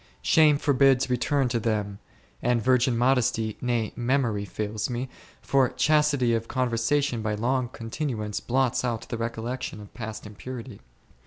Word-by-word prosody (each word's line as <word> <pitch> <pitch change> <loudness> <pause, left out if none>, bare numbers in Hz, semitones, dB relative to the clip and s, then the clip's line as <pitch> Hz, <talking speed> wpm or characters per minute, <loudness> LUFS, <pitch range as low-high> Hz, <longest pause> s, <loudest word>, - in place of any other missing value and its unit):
Shame 155 -2 +5
forbids 135 -2 +3
return 135 +2 +1
to 120 -1 0
them, 105 -3 -2 0.4
and 125 -1 +2
virgin 125 0 +2
modesty, 120 -3 +1
nay, 120 -3 -1
memory 120 -4 0
fails 105 +2 -3
me, 125 +1 -3 0.3
for 135 -2 +3
chastity 150 -5 +2
of 115 0 -1
con 130 -2 -1
versation 120 +1 +1
by 105 -1 -1
long 125 +3 0
continuance 115 -3 -4
blots 130 0 0
out 115 -2 -2
the 115 - -3
recollec 115 +2 -3
tion 110 - -5
of 105 -1 -12
past 110 -2 -7
impurity. 115 +3 -8
120 Hz, 150 wpm, -26 LUFS, 110-130 Hz, 0.4 s, Shame